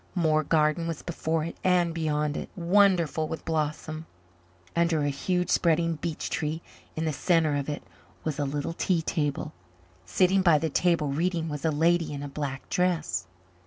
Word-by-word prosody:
More 155 -3 +2
garden 155 +2 +2
was 165 -2 -4
before 160 -2 -1
it 165 - -6
and 180 -2 +3
beyond 150 -2 0
it, - - -5
wonderful 175 -4 +3
with 160 - -6
blossom. 155 0 -2 0.7
Under 170 -3 +2
a 145 - +1
huge 180 +6 -1
spreading 165 -1 +2
beech 160 0 -4
tree 155 +2 -2 0.3
in 160 - -2
the 155 - 0
centre 160 -1 +2
of 140 0 -2
it 145 - -4 0.4
was 155 -2 -3
a - - +1
little 145 +3 -2
tea 170 -1 0
table; 145 -3 -2 0.5
sitting 185 - +3
by 170 -4 +5
the 160 0 -1
table 165 -2 +2
reading 165 +3 0
was 150 -2 -5
a - - +4
lady 160 0 +2
in 140 0 -5
a - - -4
black 140 -1 -5
dress. 165 - 0
160 Hz, 170 wpm, -27 LUFS, 150-170 Hz, 0.7 s, by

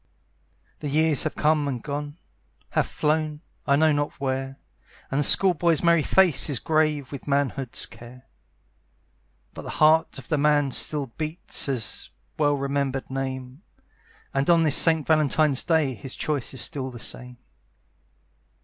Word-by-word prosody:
The 150 - -4
years 155 0 +2
have 155 - -3
come 150 -1 +1
and 130 -3 -3
gone, 145 +1 -5 0.5
Have - - 0
flown, 155 0 -1 0.3
I 140 - +4
know 155 +2 +3
not 145 0 -2
where, 135 0 -3 0.5
And 135 - 0
the - - +2
school 185 +6 +5
boy's 170 -1 +1
merry 170 -1 +4
face 170 -3 +2
Is 140 - +3
grave 155 -1 0
with 140 -1 -9
manhood's 140 -2 -1
care; 125 +2 -14 1.3
But - - -8
the - - -9
heart 155 +1 +3
of 130 -4 -11
the 155 - 0
man 145 -1 +2
still 145 +2 +1
beats 155 -1 -2
At 135 - +1
the 115 - -3 0.3
well 145 -1 +2
remembered 140 -1 -3
name, 130 +1 -5 0.7
And 135 +3 0
on 170 -1 +5
this 155 -2 +4
St. 160 -3 +5
Valentine's 155 -2 +2
Day 160 -5 +1
His 125 +4 -9
choice 145 -5 -2
is - - -3
still 135 -5 -4
the 125 - -10
same. 125 +1 -3
145 Hz, 155 wpm, -24 LUFS, 135-155 Hz, 1.3 s, school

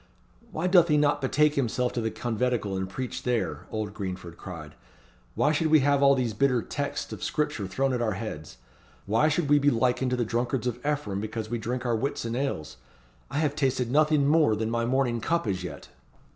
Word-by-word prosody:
"Why 160 -1 -3
doth 180 -2 +6
he 150 -2 +3
not 145 0 +2
betake 150 +3 +3
himself 125 -2 0
to 120 - -1
the 110 - 0
conventicle 115 -3 -1
and 95 0 -3
preach 125 +6 -5
there?" 125 -2 -2
old 105 -2 -4
Greenford 90 -4 -6
cried. 80 -5 -9 0.6
"Why 150 - +3
should 155 +1 +1
we 155 -1 +5
have 140 0 +3
all 140 0 +6
these 125 -4 -1
bitter 125 +1 +2
texts 140 0 -4
of - - -7
scripture 130 -10 -1
thrown 135 +8 0
at 125 - -1
our 110 -3 0
heads? 95 - -7 0.5
Why 115 +9 +3
should 155 0 +1
we 145 +1 +5
be 145 +1 +4
likened 125 +1 +1
to 125 - 0
the 120 - 0
drunkards 120 +2 -1
of 125 0 -3
Ephraim 145 -10 -1
because 110 +1 -5
we 120 - -1
drink 125 +3 -3
our 120 -1 +1
Whitsun 115 -1 -2
ales? 125 - -3 0.5
I - - -4
have 150 -2 +1
tasted 130 -4 0
nothing 150 0 +3
more 150 -6 +4
than 110 +1 -2
my 115 0 0
morning 125 -2 +1
cup 170 +7 0
as 95 -2 -2
yet." 75 -6 -8
125 Hz, 205 wpm, -27 LUFS, 110-145 Hz, 0.6 s, doth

